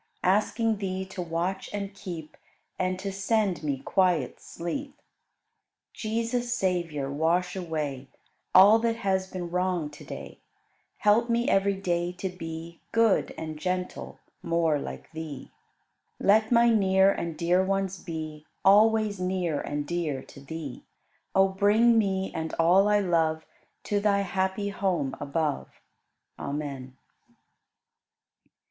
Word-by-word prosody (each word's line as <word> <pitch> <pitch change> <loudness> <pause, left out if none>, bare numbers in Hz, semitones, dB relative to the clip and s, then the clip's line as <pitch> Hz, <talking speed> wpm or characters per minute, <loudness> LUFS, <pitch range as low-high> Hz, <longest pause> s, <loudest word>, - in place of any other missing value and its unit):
Asking 215 +3 +2
Thee 190 -1 -3
to 190 -1 -6
watch 175 +3 -2
and 200 -1 -4
keep 175 -6 -8 0.4
And 185 0 0
to 195 +1 -4
send 195 -1 0
me 145 -3 -1
quiet 165 -1 +1
sleep. 275 - -6 0.9
Jesus, 230 +2 -2
Savior, 170 - -1
wash 170 +5 +1
away 150 -7 -4 0.5
All 200 +4 +9
that 230 0 +1
has 190 -3 0
been 180 -2 -6
wrong 180 -4 0
to 145 - -12
day; - - -9 0.6
Help 215 +3 +3
me 235 +1 +1
every 195 0 +3
day 175 -2 -1
to 185 +1 -4
be 165 -1 -8
Good 225 -3 +2
and 155 -1 -6
gentle, 180 +2 -3 0.2
more 165 -3 +1
like - - -8
Thee. 160 -4 -7 0.7
Let 215 +3 +4
my 235 0 +5
near 190 -2 +4
and 170 -4 -4
dear 175 +2 +3
ones 195 -1 -1
be 155 -3 -6 0.2
Always 210 0 +5
near 180 -4 -1
and 145 0 -3
dear 155 -5 -2
to - - -14
Thee. 145 -2 -7 0.5
O 190 0 +6
bring 210 +4 +4
me 190 -2 -1
and 160 0 -3
all 180 +5 +5
I 210 0 +4
love 160 -4 +1 0.4
To 205 - 0
Thy 200 -1 +2
happy 190 +1 -1
home 185 -9 -1
above. 145 0 -1 0.7
Amen. 140 -3 -5
185 Hz, 130 wpm, -27 LUFS, 160-200 Hz, 0.9 s, All